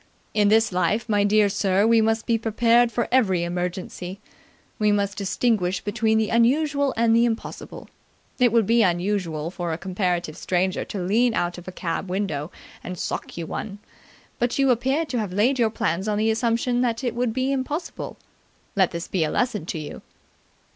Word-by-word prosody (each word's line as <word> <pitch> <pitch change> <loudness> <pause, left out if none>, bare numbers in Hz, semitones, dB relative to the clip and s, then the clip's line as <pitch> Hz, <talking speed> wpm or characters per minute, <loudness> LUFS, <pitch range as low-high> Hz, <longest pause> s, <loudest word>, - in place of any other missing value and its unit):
In 210 -1 +3
this 220 +1 +4
life, 185 +6 0
my 205 -2 +2
dear 210 0 +4
sir, 200 0 +1
we 230 0 +5
must 225 0 +1
be 230 - +2
prepared 230 +2 +3
for 240 +1 -1
every 195 -9 +3
emergency. 180 +1 -4 0.6
We 210 -1 +3
must 200 -1 0
distinguish 195 -2 0
between 220 +1 +1
the 220 -1 0
unusual 280 +4 +2
and 230 0 +3
the 235 - +5
impossible. 230 -1 -5 0.5
It 245 -2 +4
would 230 -2 +3
be 230 +3 +3
unusual 175 -4 0
for 175 -2 -4
a 160 - -2
comparative 180 -3 -2
stranger 185 +1 -1
to 195 -3 -5
lean 225 +5 +2
out 175 0 -1
of 175 - -15
a - - -5
cab 180 +1 -4
window 180 -6 -2 0.3
and 180 0 -6
sock - - -4
you 170 - -3
one, 200 +5 -5 0.6
but 240 0 0
you 275 -1 +4
appear 265 +7 +1
to 255 -5 -2
have 205 -4 -3
laid 245 +7 +2
your 230 -2 +3
plans 190 -2 -2
on 210 -1 0
the 220 +1 +2
assumption 235 +2 0
that 235 0 -1
it 245 - -1
would 240 0 0
be 260 +3 -1
impossible. 275 +5 -4 0.6
Let 190 -3 +3
this 170 0 -5
be 180 -4 0
a 155 - 0
lesson 215 -7 -1
to 170 - -3
you!" 150 -2 -7
210 Hz, 185 wpm, -24 LUFS, 185-235 Hz, 0.6 s, we